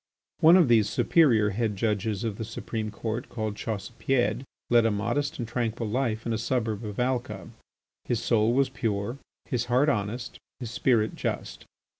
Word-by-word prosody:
One 165 +3 +8
of 175 -6 +5
these 110 -3 +4
superior 115 -11 +3
red 110 -3 0
Judges 105 0 -1
of 110 -3 -3
the - - -2
Supreme 110 0 -4
Court, 110 +2 -4
called 110 -3 -3
Chaussepied, 115 +3 -1 0.3
led 120 -1 +6
a 115 - +3
modest 125 +8 -1
and 120 - -4
tranquil 115 -1 -2
life 115 -1 -1
in 115 - -1
a 110 - -1
suburb 115 -2 -1
of 105 0 -6
Alca. 120 -7 -2 0.6
His 120 - 0
soul 115 -1 +2
was 135 +2 +2
pure, 110 +2 -2 0.3
his 120 -3 -1
heart 125 +5 +3
honest, 120 0 -3 0.2
his 120 -3 -6
spirit 115 -4 +1
just. - - -4
115 Hz, 165 wpm, -27 LUFS, 110-125 Hz, 0.6 s, One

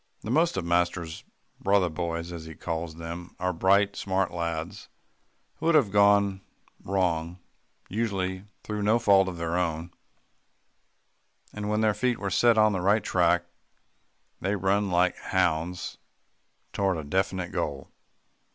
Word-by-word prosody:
The 110 - -4
most 165 - +2
of 95 - -2
master's 85 -1 -1 0.4
"brother 100 -2 +3
boys," 85 +1 -4
as 85 -2 -7
he 80 -1 -9
calls 80 -1 -4
them, 85 +1 -8
are 90 0 0
bright, 100 +3 +3
smart 95 -1 -1
lads 85 +3 -4 0.7
who 160 - -3
have 135 -10 +4
gone 100 -1 +4 0.4
wrong, 90 -3 -1 0.5
usually 95 -3 -2 0.2
through 105 -1 -4
no 105 +3 +3
fault 100 -4 +4
of 90 -2 -5
their 85 0 -2
own, 85 0 -2 1.6
and 105 0 -4
when 105 +1 +1
their 110 -1 +3
feet 120 +3 0
are 100 -1 -3
set 120 +4 +4
on 110 -1 +5
a 95 - -1
right 100 +3 +3
track, 85 -1 +2 0.9
they 100 +2 -1
run 100 +1 +1
like 90 0 +2
hounds 90 -1 -1 0.7
toward 95 -3 +1
a 80 - -5
definite 95 +3 -1
goal. 75 -6 -3
95 Hz, 140 wpm, -27 LUFS, 85-100 Hz, 1.6 s, on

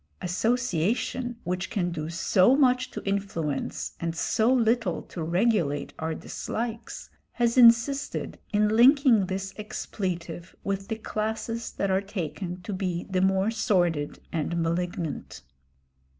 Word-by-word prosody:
Association, 235 +4 0
which 180 +1 -2
can 180 -5 -1
do 155 -1 -4
so 185 +7 +4
much 255 -2 +3
to - - -7
influence 195 -7 -2
and 165 -1 -2
so 225 +7 +2
little 235 -2 +2
to 170 - -8
regulate 170 -4 +1
our 160 0 -2
dislikes, 230 +6 -5 0.2
has 235 -1 +1
insisted 245 +3 +4
in 210 -1 +3
linking 240 -2 +5
this 195 +1 -4
expletive 185 -4 -5
with 195 0 -2
the 220 - -2
classes 220 +1 -3
that 200 -1 -1
are 190 +1 +2
taken 185 -2 -5
to 205 - -4
be 185 -2 -2
the 185 -1 +2
more 190 +2 +2
sordid 175 -9 +1 0.2
and 170 +1 -1
malignant. 170 -1 -3
195 Hz, 125 wpm, -27 LUFS, 175-230 Hz, 0.2 s, linking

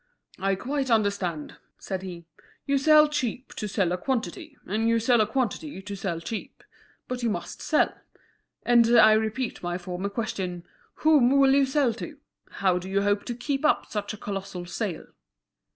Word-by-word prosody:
"I 195 0 +1
quite 265 +5 -2
understand," 200 -8 0 0.2
said 190 -1 -5
he; 175 -3 -8 0.4
"you 280 0 +2
sell 305 +2 +6
cheap 260 -3 -3
to 210 - -4
sell 190 -3 0
a 180 - -1
quantity, 275 - -3
and 220 +4 0
you 230 - +3
sell 235 0 +3
a 215 - +2
quantity 260 +2 -2
to 200 +1 -7
sell 185 -4 -3
cheap. 210 +6 -7 0.4
But 250 0 -4
you 235 - +1
must 215 - -5
sell, - - +2 0.7
and 235 0 +5
I 220 -1 +8
repeat 220 +3 -1
my 175 0 -2
former 180 +2 -4
question: 190 -5 -4 0.4
Whom 295 -6 +6
will 270 -1 +5
you 275 -1 +4
sell 265 -3 +2
to? 295 +6 -8 0.3
How 185 -2 +1
do 185 +1 -8
you 200 +1 +1
hope 205 0 +1
to 240 - -4
keep 270 +3 -2
up 305 - +2
such 205 -1 -3
a - - -14
colossal 195 -3 -5
sale?" 180 -1 -4
220 Hz, 175 wpm, -26 LUFS, 190-260 Hz, 0.7 s, I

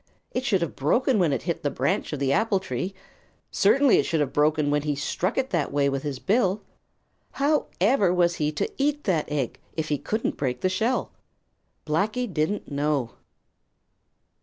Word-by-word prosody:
It 250 - -2
should 195 -8 +1
have 170 - -4
broken 235 - +2
when 170 -5 +3
it 135 - -1
hit 170 -2 -2
the 145 - 0
branch 135 0 -1
of 150 - -2
the 140 0 +1
apple 210 -1 +2
tree. 185 +3 -4 0.6
Certainly 275 -3 +4
it - - +3
should 165 - 0
have 145 -3 -1
broken 150 0 +2
when 150 0 +2
he 150 0 -1
struck 170 - -2
it 265 0 0
that 170 -5 0
way 140 0 +2
with 135 -1 -2
his 145 -2 -4
bill. 205 - +1 0.7
However 270 - +2
was 175 -1 +2
he 150 0 0
to - - -2
eat 295 +1 +1
that 160 -6 0
egg, 140 -5 -2 0.2
if 155 -1 -2
he 145 -2 0
couldn't 220 +1 -2
break 130 -3 -2
the 185 - +2
shell? 225 +7 0 0.7
Blacky 210 +11 0
didn't 175 -2 -2
know. 140 -4 0
170 Hz, 180 wpm, -25 LUFS, 145-210 Hz, 0.7 s, Certainly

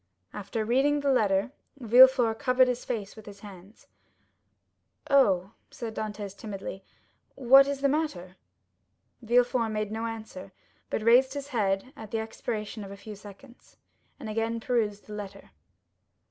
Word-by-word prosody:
After 210 +2 -4
reading 275 +5 +2
the 280 -1 +1
letter, 205 -2 +1 0.3
Villefort 245 -2 +5
covered 255 -1 +3
his 250 0 -2
face 210 -5 -5
with 220 -2 -14
his 200 -1 -12
hands. 195 0 -14 1.3
"Oh," 195 -9 +3 0.2
said 230 -3 -7
Dantès 205 -2 -6
timidly, 195 -2 -7 0.5
"what 270 +2 +6
is 280 -1 -3
the 280 - +3
matter?" 270 - -2 0.9
Villefort 240 0 +2
made 215 -1 -3
no 225 +1 -3
answer, 220 -4 -8 0.4
but 220 - -3
raised 255 +4 +4
his 285 0 -6
head 210 0 -1
at 220 -5 -10
the 225 - -2
expiration 220 -1 -5
of 195 - -9
a 200 - -9
few 210 +1 -10
seconds, 205 +6 -16 0.4
and 240 - -8
again 225 +1 -2
perused 220 -4 -1
the 210 - -10
letter. 200 -1 -9
225 Hz, 145 wpm, -27 LUFS, 205-250 Hz, 1.3 s, what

